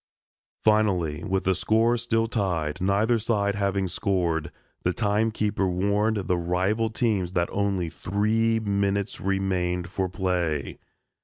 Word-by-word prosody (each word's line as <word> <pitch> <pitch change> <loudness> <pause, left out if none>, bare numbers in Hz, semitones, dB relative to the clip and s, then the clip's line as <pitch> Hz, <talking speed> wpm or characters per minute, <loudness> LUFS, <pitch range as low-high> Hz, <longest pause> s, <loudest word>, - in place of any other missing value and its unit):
Finally, 95 -8 +2
with 95 -2 -1
the 95 - +2
score 115 +5 +2
still 115 -1 0
tied, 90 -10 -2
neither 105 +5 +2
side 105 -2 0
having 100 -2 0
scored, 85 -4 -1 0.3
the 90 - 0
time 105 +1 +1
keeper 105 -3 -1
warned 100 +4 +1
the 90 -1 +1
rival 95 +6 0
teams 105 -6 0
that 85 -1 +1
only 100 -3 0
three 110 +6 0
minutes 100 -1 -1
remained 95 -2 -1
for 95 -1 -1
play. 90 -5 -2
100 Hz, 130 wpm, -26 LUFS, 90-110 Hz, 0.3 s, Finally